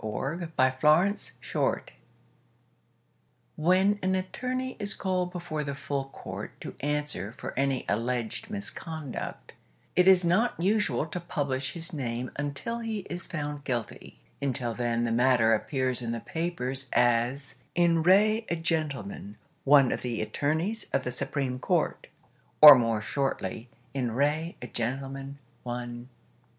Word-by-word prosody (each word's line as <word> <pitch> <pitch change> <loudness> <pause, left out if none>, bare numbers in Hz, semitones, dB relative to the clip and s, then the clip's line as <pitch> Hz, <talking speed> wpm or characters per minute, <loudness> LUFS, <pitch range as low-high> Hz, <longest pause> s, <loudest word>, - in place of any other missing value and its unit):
"In 110 - -2
Re 165 +10 -3
a 130 0 +5
Gentleman, 170 +7 +5 0.4
One" - - +1 1.7
When 185 +5 +3
an 185 0 +1
attorney 255 +7 -3
is 205 -1 -1
called 185 -2 -1
before 170 -4 -4
the 140 -1 -4
Full 140 0 -3
Court 135 - -8
to - - -6
answer 145 -8 -2
for - - -7
any 135 -1 0
alleged 120 - -2
misconduct 160 - -6 0.4
it 180 0 +5
is 185 -2 +7
not 190 +7 +2
usual 185 - +2
to 170 +3 -5
publish 140 -5 -2
his 170 +1 -6
name 125 -3 -3
until 145 +12 -3
he 225 -3 -3
is 175 0 -4
found 145 -3 -4
guilty; 120 - -4 0.2
until 125 -4 -1
then 120 0 0
the 115 - 0
matter 120 -1 +4
appears 130 +2 0
in 115 -1 -2
the 115 - -3
papers 135 -4 -3
as 120 +3 +2 0.2
"In 170 -1 +4
re 215 +6 +4
a 170 - +1
Gentleman, 145 - -3 0.3
One 140 -2 +6
of - - -2
the 120 -3 -2
Attorneys 160 - -1
of 135 - +1
the 125 - -3
Supreme 130 0 -3
Court", - - 0 0.5
or, 150 -1 +13
more 115 -4 +1
shortly, 120 -3 -2 0.2
"In 125 -4 -1
re 150 +6 0
a - - -3
Gentleman, 135 +3 -4 0.2
One". 120 0 -6
140 Hz, 140 wpm, -28 LUFS, 125-175 Hz, 1.7 s, or